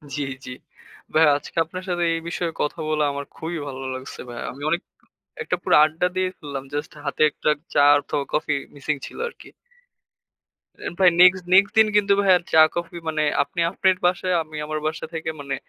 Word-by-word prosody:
জি, 145 - -2 0.2
জ্বি। - - -7 0.6
ভাইয়া 155 -1 +6
আজকে 145 - -12
আপনার 185 +3 -8
সাথে 175 -1 0
এই 165 - -1
বিষয়ে 170 -1 -2
কথা 150 +3 -2
বলে 155 -1 +1
আমার 140 0 -5
খুবই 165 +1 -5
ভালো 135 -1 -6
লাগছে 130 +1 -8
ভাইয়া। 120 - -6
আমি 140 - -13
অনেক 170 +2 0 0.6
একটা - - -1
পুরো - - +2
আড্ডা 160 +3 0
দিয়ে 185 0 +1
ফেললাম। 140 -3 -6
জাস্ট 145 - -4
হাতে 140 +2 -1
একটা 150 - -1 0.2
চা 145 - +5 0.2
অথবা 145 0 -3
কফি 150 -1 +1 0.2
মিসিং 145 +1 -2
ছিল - - -11
আরকি। - - -15 1.5
ভাই 185 -2 +6
নেক্সট, 185 0 +6
নেক্সট 200 +2 +5
দিন 220 - +7
কিন্তু 200 -1 +4
ভাইয়া 190 -2 +5
চা 160 - +7 0.2
কফি, 170 0 -4
মানে 155 -1 0 0.2
আপনি 170 +4 -4
আপনার 190 -1 +2
বাসায় 185 0 +1
আমি 155 -1 -11
আমার 155 0 -3
বাসা 160 +1 -3
থেকে 160 0 -3
মানে 140 -1 -4
160 Hz, 185 wpm, -23 LUFS, 145-180 Hz, 1.5 s, দিন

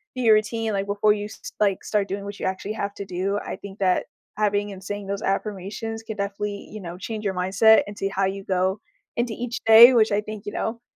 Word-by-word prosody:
your 230 -4 +5
routine, 220 +1 0
like, 195 0 -1
before 205 +1 +3
you, 205 0 -4
s 210 - -9
s - - -7
like, 200 -3 +1
start 205 -2 0
doing 200 +1 -4
what 200 0 -7
you - - -3
actually 190 +3 -3
have 200 -2 -3
to 200 - -6
do, 190 +2 -2
I - - -5
think 200 0 -11
that 185 -2 +2 0.3
having 205 -1 0
and 190 -1 -10
saying 205 0 -5
those 200 0 -3
affirmations 210 +3 -3
can 220 -2 -7
definitely, 200 +1 -4
you 215 -1 -8
know, 175 0 -7
change 215 +3 -5
your 195 - -1
mindset 195 +5 +5
and 205 - -9
see 195 - -1
how 195 0 0
you 195 +1 -3
go 190 +1 0 0.4
into 240 -1 0
each 240 +1 -4
day, 230 +3 +10
which 220 -3 +4
I 205 - +2
think, 215 0 -8
you 205 - -4
know, 230 +3 -3
205 Hz, 240 wpm, -24 LUFS, 195-215 Hz, 0.4 s, day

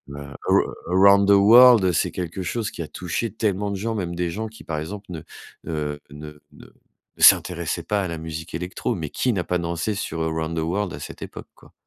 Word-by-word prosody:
A 70 -1 -9
arou - - +5 0.3
Around 100 +2 +5
the - - +7
World, 110 -1 +7
c'est - - +1
quelque 90 +1 -5
chose 105 +5 -3
qui - - -7
a 80 - -5
touché 90 +6 -3
tellement 105 -2 -1
de 100 - -3
gens. 115 +3 -3
Même 90 -4 -3
des 85 -1 -2
gens 110 +6 -4
qui, 110 - -15
par 75 -2 -3
exemple, 100 +6 -7
ne, 85 -4 -6 0.5
heu, 75 -2 -3
ne 75 0 -11
ne - - -15 0.5
ne - - -11
s'intéressaient 85 -1 +4
pas 100 +4 -1
à 95 - -2
la 85 - -4
musique 80 +1 -7
électro, 90 +7 -3
mais 80 -5 -5
qui 125 - 0
n'a 95 -6 -1
pas 90 - -1
dansé 85 +4 -2
sur 80 -5 -4
Around 80 0 -2
the - - 0
World 90 +4 -2
à - - -7
cette - - -9
époque, - - -9
quoi? - - -20
90 Hz, 225 wpm, -23 LUFS, 80-100 Hz, 0.5 s, the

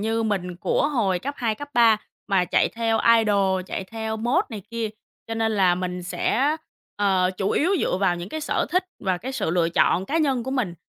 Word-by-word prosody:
như 225 +2 0
mình 185 -5 -2
của 280 +9 +1
hồi 210 -11 +1
cấp 280 +8 -5
2, 230 -4 0
cấp 290 +6 -8
3 230 -2 +6 0.3
mà 190 -2 +3
chạy 180 - +2
theo 225 -1 0 0.2
idol, 200 -4 +2
chạy 190 - -4
theo 220 +2 -4
mốt 245 - +1
này 215 -3 -6
kia, 230 -1 -2 0.4
cho 225 - -4
nên 225 0 0
là 190 -4 +3
mình 180 0 -4
sẽ, 270 - 0 0.4
ờ, 190 -3 +2
chủ 195 +1 -1
yếu 330 +5 +2
dựa - - 0
vào 185 -2 +1
những 175 +2 -6
cái 315 - -5
sở - - -1
thích 365 +1 +2 0.2
và 185 -2 +1
cái 255 +8 -6
sự 265 - -1
lựa 170 -1 +2
chọn 175 +2 +2
cá 320 - 0
nhân 270 -6 +1
của 265 - -5
mình. 245 -10 -1
220 Hz, 220 wpm, -24 LUFS, 185-240 Hz, 0.4 s, 3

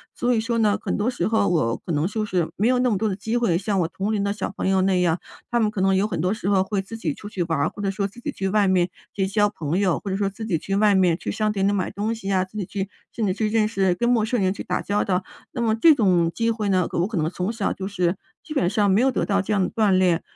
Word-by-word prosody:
所 245 0 +1
以 225 - +2
说 230 0 -1
呢， 210 -2 +3
很 - - -2
多 210 +3 0
时 245 - -1
候 220 -2 +2
我 150 -10 +1
可 175 - -3
能 150 +2 +1
就 215 +1 -2
是， 180 -5 -1
没 215 +4 +2
有 250 0 +3
那 250 0 +2
么 210 - +1
多 220 +3 0
的 195 - -1
机 220 +4 -2
会， 215 -8 +2
像 200 -1 -1
我 165 - +1
同 195 +4 -3
龄 205 -2 0
的 200 - 0
小 205 -1 -4
朋 - - -1
友 190 -1 +3
那 190 -1 +2
样 170 -1 +1 0.3
他 240 - +2
们 215 - +2
可 190 - -3
能 195 0 +3
有 195 - +2
很 175 -6 -4
多 180 +5 +1
时 210 -3 -3
候 195 -2 +3
会 195 0 -2
自 225 +4 -8
己 165 -9 -2
出 205 - -10
去 185 -4 -2
玩 165 -2 -1
儿， 150 - +1
或 205 - -9
者 195 - +1
说 200 0 -1
自 205 - -15
己 - - -4
去 190 0 -3
外 205 0 +3
面 185 -1 +2 0.2
结 195 - 0
交 205 +1 +2
朋 165 -4 -3
友， 190 -3 +1
或 200 - -6
者 190 - -1
说 200 -1 0
自 220 +3 -8
己 170 -7 +1
去 195 +5 -3
外 205 -1 +4
面 180 -3 +4
去 - - -4
商 215 0 0
店 195 -2 0
里 - - +3
买 195 -3 -1
东 210 +3 -2
西 200 -3 -4
啊， 185 -1 +2
自 190 +3 -10
己 195 - -2
去 195 0 -4 0.3
甚 225 - -1
至 185 - +1
去 215 0 0
认 215 -1 +2
识 195 -4 +1
跟 240 +4 0
陌 230 -3 +3
生 230 0 0
人 185 -1 +2
去 - - -7
打 - - -2
交 205 +1 0
道。 185 -1 0 0.3
那 240 - -4
么 220 -2 +2
这 310 +8 +6
种 180 -7 +2
机 230 0 0
会 215 -2 -2
呢， 185 -3 +2
我 175 +3 0
可 220 - -6
能 155 0 +1
从 185 +4 -3
小 215 -3 -1
就 190 0 -4
是 180 -2 0 0.3
基 305 - -7
本 180 - +1
上 205 0 +2
没 195 - +4
有 265 +2 +4
得 - - -1
到 200 -1 +1
这 195 - -2
样 195 -2 +2
的 - - -1
锻 215 -2 +2
炼， 185 -3 +3
200 Hz, 345 characters per minute, -23 LUFS, 185-215 Hz, 0.3 s, 这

